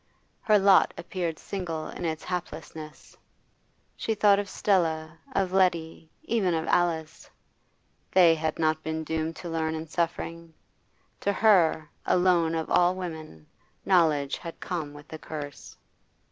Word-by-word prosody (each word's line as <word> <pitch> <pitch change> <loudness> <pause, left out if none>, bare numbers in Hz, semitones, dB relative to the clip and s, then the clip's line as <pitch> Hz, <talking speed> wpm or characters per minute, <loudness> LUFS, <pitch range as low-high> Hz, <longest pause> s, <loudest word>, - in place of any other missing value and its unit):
Her 215 -1 +4
lot 195 -1 +5
appeared 170 -2 -3
single 170 -5 -5
in - - -6
its 160 -1 -3
haplessness. 160 -3 -7 0.8
She 225 - -2
thought 205 -1 +5
of 200 -1 -4
Stella, 160 -5 0
of 190 -2 0
Letty, 170 -4 +1
even 195 -7 +1
of 160 0 -1
Alice; 160 -3 0 0.8
they 175 -3 +6
had 160 -1 -2
not 155 -1 +1
been 160 0 -3
doomed 160 +1 -2
to 175 - -7
learn 160 -1 -1
in 160 0 -5
suffering. 165 0 -3 0.6
To 200 - 0
her, 180 -7 +3 0.2
alone 175 -3 +3
of 160 -1 -2
all 180 +1 +4
women, 160 - -7 0.4
knowledge 155 -7 +3
had 165 -1 -8
come 165 -5 -4
with 145 +1 -13
a 160 - -6
curse. 145 -3 -8
165 Hz, 135 wpm, -27 LUFS, 160-180 Hz, 0.8 s, they